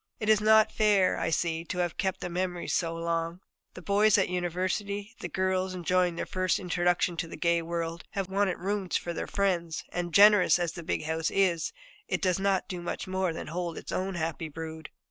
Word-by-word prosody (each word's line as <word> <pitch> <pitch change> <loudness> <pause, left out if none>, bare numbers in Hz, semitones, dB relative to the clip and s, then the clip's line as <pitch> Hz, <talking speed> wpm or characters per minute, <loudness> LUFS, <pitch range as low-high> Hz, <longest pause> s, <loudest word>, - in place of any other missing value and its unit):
It 215 - -2
was 215 -1 +5
not 220 0 +5
fair, 205 -3 +3
I - - 0
see, 165 0 0
to 180 - -5
have 175 -2 -1
kept 190 -2 -2
the - - -3
nurseries 180 0 -2
so 165 -1 0
long. 165 +1 -2 0.4
The 180 - -10
boys 205 +3 +4
at 195 - +3
the - - -5
University, 185 +5 -2
the 175 - -5
girls, 185 +1 0
enjoying 180 0 +1
their - - -3
first 185 -2 0
introduction 175 -1 0
to 165 - -2
the - - -9
gay 170 -1 +2
world, 165 0 -4
have 195 -2 -2
wanted 195 -1 0
rooms 195 0 -1
for 170 - -5
their - - -4
friends, 175 -5 -1
and 175 -1 -3
generous 205 0 +7
as 175 -2 -1
the 170 - -8
big 160 - -2
house 160 +1 -1
is, 180 -4 +1 0.4
it - - -1
does 185 -2 +1
not 195 -1 +1
do 180 -2 -5
much 175 - -4
more 185 -1 0
than 160 - -6
hold 170 +1 -4
its - - -7
own 190 0 -2
happy 160 -1 -3
brood. 160 0 -7
180 Hz, 210 wpm, -28 LUFS, 170-195 Hz, 0.4 s, generous